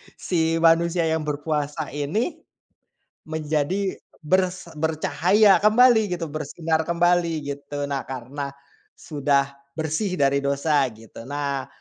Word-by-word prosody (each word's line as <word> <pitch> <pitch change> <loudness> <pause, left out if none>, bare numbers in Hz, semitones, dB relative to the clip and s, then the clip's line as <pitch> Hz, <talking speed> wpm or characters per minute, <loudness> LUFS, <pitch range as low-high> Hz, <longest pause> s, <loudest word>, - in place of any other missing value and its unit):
si 165 -2 0
manusia 170 +1 +4
yang 160 -1 -1
berpuasa 150 0 -2
ini, 195 - -2 0.9
menjadi 160 +5 -1 0.2
bers 185 +1 0
bercahaya 175 +5 +3
kembali 220 -3 +5
gitu, 170 - -4
bersinar 160 +2 -1
kembali 175 0 +2 0.2
gitu. 145 0 -5
Nah, 135 - -1
karena 135 +2 -5 0.5
sudah 140 -2 0 0.3
bersih 160 +5 -1
dari 140 -1 +3
dosa 140 +1 +1 0.2
gitu. 115 +2 -12
Nah, 140 -2 -2
160 Hz, 105 wpm, -23 LUFS, 145-175 Hz, 0.9 s, kembali